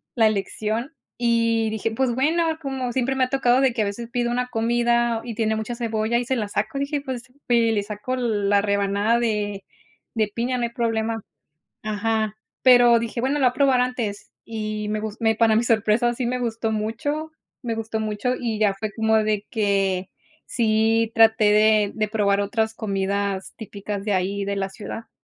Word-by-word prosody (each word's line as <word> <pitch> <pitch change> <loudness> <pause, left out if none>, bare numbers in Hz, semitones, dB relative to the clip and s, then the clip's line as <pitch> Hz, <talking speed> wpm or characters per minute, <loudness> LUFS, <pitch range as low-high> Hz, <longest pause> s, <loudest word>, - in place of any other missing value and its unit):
la 225 -2 +5
elección, 215 +5 -2 0.2
y 230 -2 +2
dije, 220 +1 -2
pues, 245 +2 0
bueno 320 +4 +1
como 265 -3 -3
siempre 260 +1 0
me 260 - +2
ha - - -8
tocado 260 -1 +3
de 265 -3 +3
que 230 - -1
a - - -1
veces 230 +4 -5
pido 240 -1 0
una 250 +1 -1
comida, 235 0 +1
y 235 - -5
tiene 220 -1 0
mucha 220 +2 -4
cebolla 225 -1 -1
y 245 - -3
se 260 - 0
la 215 -4 -2
saco, 280 +7 -2
dije: 280 +1 -1
"Pues, 260 -4 -5 0.3
eh, 235 -1 +4
le 205 -2 0
saco 210 +5 -4
la 205 -4 +1
rebanada 200 +2 +1
de 210 -4 -1 0.5
de 215 -1 +2
piña, 245 +3 -1
no 245 - -2
hay 235 - 0
problema". 225 -1 -1 0.6
Ajá, 215 0 -1 0.3
pero 245 -2 +7
dije: 230 +1 -3
"Bueno, 265 +4 0
lo 275 - +1
voy - - +5
a - - -13
probar 265 -2 +3
antes", 240 -5 -3
y 215 -1 -4
me 215 - -1
gus 215 -1 -5
me 225 -1 +2
para 225 -1 +4
mi 230 - +3
sorpresa, 230 +1 +2
sí 245 0 -2
me 250 +1 -1
gustó 225 -1 -2
mucho 235 +9 -2 0.3
me 235 -2 -2
gustó 225 0 -3
mucho, 215 +4 -1
y 230 -3 -2
ya 210 -2 +3
fue 205 +2 -4
como 220 -1 +2
de 215 -1 0
que 195 -4 0 0.4
sí 225 0 +1
traté 220 -2 +5
de 215 -1 +4
de 215 -1 -1
probar 205 -2 +1
otras 220 +2 0
comidas 200 -2 -2
típicas 205 -2 -6
de 210 -1 0
ahí, 195 +2 -1
de 200 0 -2
la 195 -1 -1
ciudad. 215 +3 -8
225 Hz, 195 wpm, -23 LUFS, 210-240 Hz, 0.6 s, pero